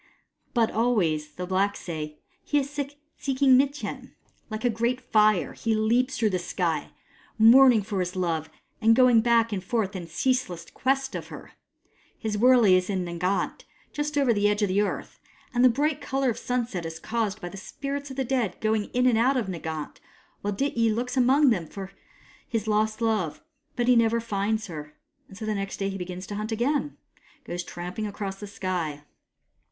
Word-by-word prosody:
But 230 -2 +3
always, 170 -11 +1
the 180 +4 -5
blacks 195 +2 0
say, 155 -3 -6 0.3
he 295 - 0
is 280 0 0 0.5
seeking 270 -1 +3
Mitjen. 280 +3 -1 0.3
Like 215 +2 -4
a - - +4
great 235 +3 0
fire, 215 -6 +2
he 225 -1 -1
leaps 240 +6 +1
through 220 -3 +2
the 185 - 0
sky, 175 -3 -2 0.5
mourning 235 0 +7
for 200 -1 -3
his 180 0 -2
love 165 -4 -1 0.3
and 225 +1 +5
going 250 -2 +6
back 230 -1 +3
and 190 -2 -3
forth 210 -3 -1
in 175 -3 -5
ceaseless 180 -2 -1
quest 270 +1 0
of - - -5
her. - - -10 0.7
His 220 -2 -3
wurley 235 -3 +6
is 185 +1 +1
in 185 -3 -1
Nganat, 180 +3 -2 0.3
just 295 0 -2
over 270 -4 +4
the 205 -1 +2
edge 210 +1 0
of 205 - +1
the 195 +2 +2
earth; 210 - -3 0.3
and 245 0 +3
the 255 - +8
bright 290 +4 0
colour 270 -2 0
of 225 - -6
sunset 240 -7 -2
is 165 0 -5
caused 215 0 -2
by 175 - -6
the 175 - -10
spirits 280 +8 -5
of 265 - -8
the 265 - 0
dead 240 -7 -1
going 215 -1 +1
in 250 0 +2
and 240 -3 +4
out 260 +3 +3
of 240 - 0
Nganat, 160 -4 -5 0.4
while 205 - -1
Dityi 230 0 +1
looks 250 +3 -2
among 265 +2 +5
them 175 -7 -1
for 195 +2 -8 0.6
his 225 -2 -2
lost 215 +1 +1
love. 215 - 0 0.3
But 240 -1 0
he 250 - +6
never 230 0 +3
finds 215 0 -1
her; 150 -3 -8 0.3
and 195 - -13
so 220 - -5
next 200 -2 -3
day 195 0 -1
he 195 - -4
begins 180 +1 -6
to 205 - -6
hunt 215 +2 -4
again, 280 +6 0 0.4
and - - -39
goes 175 0 -4
tramping 180 +5 -5
across 200 -1 -5
the 205 - -7
sky. 175 -7 -3
215 Hz, 190 wpm, -26 LUFS, 185-245 Hz, 0.7 s, the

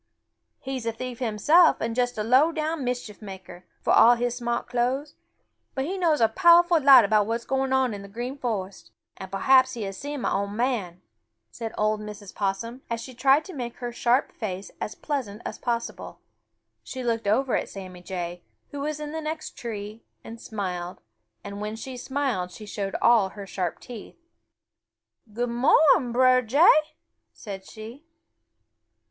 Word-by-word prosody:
"He's 260 -3 -5
a - - +1
thief 250 +1 -7
himself 265 - +4
and 225 0 -2
just 245 -1 0
a 210 - -1
low 260 +8 +4
down 315 -2 -2
mischief 245 -4 -4
maker, 190 -3 -10 0.2
for - - +2
all 240 +1 +7
his 240 0 -1
smart 240 -1 -2
clo'es, 255 +4 -1 0.6
but 265 0 -1
he 365 +6 -3
knows 335 -5 +2
a 225 - +6
powerful 345 +5 +5
lot 265 -4 +8
about 210 0 +2
what 230 - 0
is 235 - -6
going 265 0 -1
on 260 -3 +2
in 200 - -6
the 200 - -10
Green 240 +6 -5
Forest, 205 -8 -4 0.3
and 190 -1 -9
perhaps 260 +6 +4
he 230 - -4
has 195 -1 -5
seen 290 -1 -5
mah - - 0
ol' 200 - -3
man," 205 -5 -2 0.5
said 225 -1 -6
old 215 0 +1
Mrs. 210 -2 -9
Possum, 215 +6 -3
as 230 0 -2
she 255 +2 -9
tried 275 +5 +3
to 375 - -9
make 240 -4 -5
her 245 -1 -5
sharp 240 +2 +1
face 195 -3 -6
as 210 - -4
pleasant 255 -9 -4
as - - -6
possible. 235 -1 -4 0.6
She 260 -1 -7
looked 230 -3 -1
over 245 +4 +2
at - - -2
Sammy 185 -2 -9
Jay, 175 -1 -5 0.3
who 285 - -6
was 300 +1 -3
in 300 0 -5
the 320 +1 -4
next 315 +1 -5
tree, 215 -1 -6 0.2
and 230 0 -10
smiled, 180 -4 -5 0.4
and 200 0 -7
when 210 +1 -4
she 255 +3 -7
smiled 255 -8 -2
she 215 +4 -11
showed 200 -1 -4
all 225 -5 +5
her 200 +1 -9
sharp 185 -3 -3
teeth. 240 -4 -10 1.1
"Good 240 +3 -2
mo'ning, 250 +1 +4
Brer 255 +1 +5
Jay," 305 +5 +4 0.4
said 195 -3 -8
she. 225 +7 -10
235 Hz, 175 wpm, -25 LUFS, 210-265 Hz, 1.1 s, lot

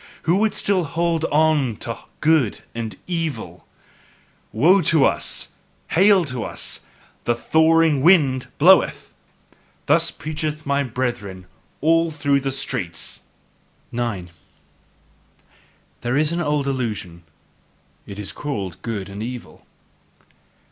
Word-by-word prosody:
Who 170 +3 +2
would 215 0 +1
still 195 -4 +2
HOLD 165 +1 0
ON 150 -6 +2
to 115 - -3 0.3
"good" 155 -8 +2
and 110 -4 -5
"evil"? 165 -4 -4 0.8
"Woe 170 - +4
to 160 -3 +4
us! - - -1 0.4
Hail 190 0 +5
to 130 -5 -4
us! - - -4 0.5
The 120 - +2
thawing 160 +2 +3
wind 135 -6 +4
bloweth!" 185 +5 +4 0.7
Thus - - +4
preach, 155 0 -6 0.2
my 140 0 +1
brethren, 120 -7 -3
through 90 - -22 0.3
all 165 +2 +3
the 140 -3 0
streets! 90 -11 -3 0.7
9. 110 -7 -3 1.7
There 120 +3 0
is 155 +1 +2
an 170 +1 -1
old 150 -3 0
illusion 110 -10 -3 0.9
it 100 - -8
is 105 -1 -4
called 100 - -5
good 105 -5 -4
and 100 +1 -8
evil. 120 +1 -8
140 Hz, 115 wpm, -21 LUFS, 115-165 Hz, 1.7 s, Hail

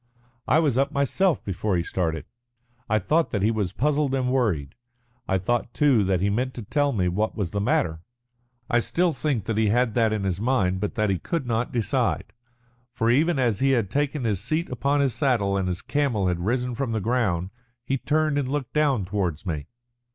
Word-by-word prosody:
I - - +4
was 145 -6 +2
up 135 - +1
myself 155 +6 +1
before 95 0 -1
he 85 - 0
started. 80 -4 -2 0.6
I 110 - +3
thought 155 - +1
that 100 -2 -1
he 110 - +3
was 105 -5 -1
puzzled 145 0 +1
and 130 -1 0
worried. 95 - 0 0.5
I 95 - +2
thought, 120 +5 -1
too, 140 -8 +4
that 95 -2 +1
he 100 - +2
meant 125 +5 -1
to 120 - -6
tell 145 +6 +1
me 95 -7 0
what 105 +5 -1
was 100 -6 -2
the 100 - -1
matter. 80 -5 +1 0.7
I 120 - +3
still 175 +7 +1
think 135 -8 -1
that 110 -1 -1
he 110 - +3
had 120 +1 +2
that 115 -2 +2
in 105 -2 -1
his 95 0 -2
mind, 105 -7 +1
but 105 +1 -3
that 110 -3 +1
he 95 - -1
could 165 -6 -3
not 115 0 -1
decide. 115 -3 -1 0.6
For 115 0 +1
even 155 +5 +3
after 120 -3 +1
he 135 - +4
had 110 -6 0
taken 145 +1 -1
his 105 -5 0
seat 155 +6 -1
upon 140 +4 +1
his 135 -4 +1
saddle 115 -9 +1
and 95 -1 0
his 90 -1 -3
camel 125 -10 0
had 90 -1 -1
risen 125 +1 0
from 120 -1 -2
the 110 - 0
ground, 100 -6 0 0.3
he 135 +2 -1
turned 155 0 +1
and 130 -2 -2
looked 140 -2 -3
down 140 -9 +2
towards 90 -4 -2
me. 75 -5 -3
115 Hz, 210 wpm, -25 LUFS, 100-135 Hz, 0.7 s, I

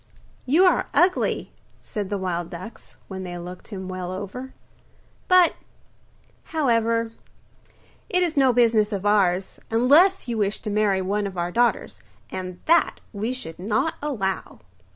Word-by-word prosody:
'You 315 +8 +5
are 365 - +3
ugly,' 365 +1 +2 0.3
said 205 -3 -4
the 205 - -1
wild 175 -3 -3
ducks, 180 +6 -10
when 190 -1 -6
they 185 - -6
had 175 - -6
looked 180 +1 -9
him 190 -3 -7
well 185 -1 -5
over; 205 +8 -6 0.8
'but, 365 -2 +6 0.9
however, 230 -6 +1 1.0
it 360 0 +2
is 335 -3 -1
no 270 -2 +5
business 230 -3 +3
of 200 -1 -3
ours, 195 -3 +2
unless 290 +11 +4
you 230 -2 -2
wish 205 0 0
to 210 - -4
marry 205 -2 +2
one 200 +2 -1
of 190 -2 -8
our 175 0 -1
daughters, 240 +4 +1 0.3
and 185 -1 -6
that 335 +1 +3
we 215 +4 -2
should 215 -12 -7
not 215 - 0
allow. 215 -11 -3
210 Hz, 150 wpm, -24 LUFS, 190-255 Hz, 1.0 s, but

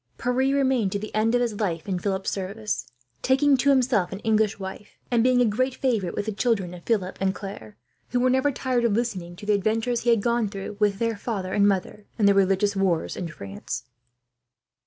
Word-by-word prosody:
Pierre 250 +1 -1 0.2
remained 260 -7 +2
to - - 0
the 210 +1 -7
end 225 +2 +2
of 245 - +2
his 230 -4 -1
life 170 -5 -2
in 185 -2 -1
Philip's 190 0 -2
service, 205 +3 -3 0.3
taking 275 +2 +4
to 275 +2 +2
himself 245 -9 +3
an 195 - -4
English 220 -1 +2
wife, 195 +1 -8
and 235 -2 +3
being 255 0 +4
a - - +5
great 255 +4 0
favourite 220 -9 -1
with - - -2
the 220 - -2
children 200 -5 0
of 175 - -9
Philip 195 -5 -1
and 190 0 +1
Claire, 110 - -8 0.3
who 245 - 0
were 255 +1 +3
never 260 +3 +2
tired 255 -2 -1
of 235 -3 +2
listening 195 -7 -2
to 205 - -10
the 210 - +2
adventures 225 +4 0
he 240 - 0
had 230 -4 +3
gone 235 -3 +1
through, 195 0 -6
with 205 -2 +2
their 230 +1 0
father 195 -4 -3
and 205 -1 +4
mother, 200 +1 -2
in 215 - +2
the 200 - +6
religious 195 +1 +2
wars 190 -4 0
in 180 - -4
France. 100 -11 -6
210 Hz, 215 wpm, -25 LUFS, 195-240 Hz, 0.3 s, the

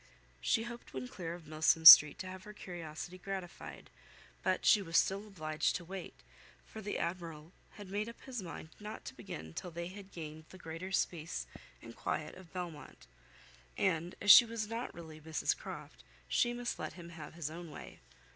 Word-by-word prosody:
She 225 - +1
hoped 235 - -9
when 130 -1 -4
clear 170 +4 -6
of 175 -2 -13
Milsom 155 +1 +2
Street 150 -2 +12
to 185 - -6
have 185 0 -8
her 210 - -9
curiosity 175 -2 -7
gratified; 190 -2 -7 0.5
but - - 0
she 210 - +6
was 165 -3 0
still 200 +2 +2
obliged 155 -6 -1
to 175 - -4
wait, 190 +1 -7 0.5
for 220 - -9
the 205 0 -3
Admiral 170 -2 -4 0.2
had 205 -2 -10
made 205 +4 -2
up 235 - -12
his 250 -4 -5
mind 170 -3 -8
not 210 +1 -8
to - - -6
begin 80 +1 -8
till 180 - -5
they 170 +1 -5
had 195 +1 -11
gained 155 -1 -8
the 185 - -12
greater 165 +2 -7
space 160 - -1 0.4
and - - -10
quiet - - -3
of 185 -3 -14
Belmont; 175 -5 -7 0.7
and 175 -2 0
as 205 - +7
she - - +12
was 230 -2 -4
not 230 +3 -4
really 160 -2 -10
Mrs 160 0 0
Croft, - - -9 0.2
she 240 - +2
must 240 0 -3
let - - -4
him 170 -2 -10
have 160 -2 -10
his 160 -3 -4
own 170 +1 -8
way. - - -10
175 Hz, 185 wpm, -34 LUFS, 160-200 Hz, 0.7 s, Street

